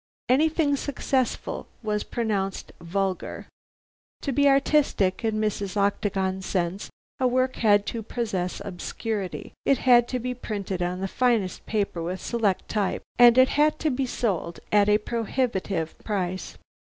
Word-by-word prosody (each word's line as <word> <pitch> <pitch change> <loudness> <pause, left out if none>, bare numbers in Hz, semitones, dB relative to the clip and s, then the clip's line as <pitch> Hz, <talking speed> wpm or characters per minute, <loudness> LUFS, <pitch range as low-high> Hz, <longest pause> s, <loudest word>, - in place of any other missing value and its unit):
Anything 300 +2 +3
successful 265 -2 -2 0.2
was 210 -1 -1
pronounced 200 -5 -2
"Vulgar!" 190 +2 -2 0.8
To 280 - -1
be 285 +2 +4
artistic 275 -9 +2
in 220 -1 0
Mrs. 205 -2 -2
Octagon's 195 -1 0
sense, 180 +1 -2 0.3
a 255 - +3
work 255 +1 +1
had 205 -2 +4
to 230 - -3
possess 200 -5 -3
obscurity, 200 +1 -4
it 275 - +3
had 240 -2 +5
to 255 - -2
be 250 +1 -3
printed 200 -6 -4
on 180 +1 -2
the 195 - -1
finest 230 -4 0
paper 200 -5 -1
with 180 +3 -3
selected 210 -3 0
type, 205 -3 -1 0.2
and 240 0 +8
it 260 0 +7
had 300 +1 +3
to 310 - 0
be 260 +1 -1
sold 185 -9 -2
at 205 0 +4
a 210 - +6
prohibitive 210 -7 -2
price. 185 -3 -3
210 Hz, 140 wpm, -25 LUFS, 190-250 Hz, 0.8 s, and